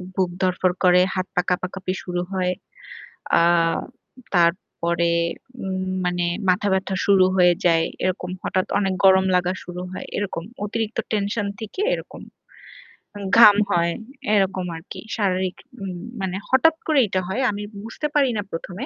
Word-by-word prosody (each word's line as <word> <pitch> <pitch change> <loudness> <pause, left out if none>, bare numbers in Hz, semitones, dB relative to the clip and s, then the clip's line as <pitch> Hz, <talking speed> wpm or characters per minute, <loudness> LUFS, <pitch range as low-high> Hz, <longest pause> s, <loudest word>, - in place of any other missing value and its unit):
বুক 185 -2 +1
ধড়ফড় 185 -1 +1
করে, 180 0 +6
হাত 185 0 -2
পা 180 - +3
কাঁপাকাঁপি 185 +1 -2
শুরু 180 -1 -2
হয়। 185 -1 0 0.9
আ - - +4 0.9
তারপরে 170 -1 +1 0.5
উম 190 0 -3 0.2
মানে 175 -1 0 0.2
মাথা 185 +3 +2
ব্যথা 190 0 0
শুরু 195 -2 +6
হয়ে 180 -1 +6
যায়। 165 -1 +4 0.2
এরকম 185 -1 -2
হঠাৎ 185 0 0
অনেক 195 -2 0
গরম 190 0 +6
লাগা 180 0 +1
শুরু 180 0 -6
হয়। 185 - -7
এরকম 190 -5 -3 0.2
অতিরিক্ত 220 +1 -3
টেনশন 205 0 -1
থেকে 220 - -6
এরকম। - - -8 1.2
ঘাম 210 -3 +9
হয় 170 -2 +2 0.4
এরকম 190 -2 +1
আরকি। 165 - -9 0.2
শারীরিক 185 -3 0 0.3
উম 185 -2 -5 0.2
মানে 190 -1 -2
হঠাৎ 310 +5 +5
এইটা - - -38
করে 305 -3 +4
এটা 190 -2 -1
হয়। 190 +7 -2
আমি 205 0 -5 0.2
বুঝতে 230 +7 -4
পারি 280 -3 +4
না 205 - -1
১ম 175 +2 -6
185 Hz, 145 wpm, -22 LUFS, 180-200 Hz, 1.2 s, ঘাম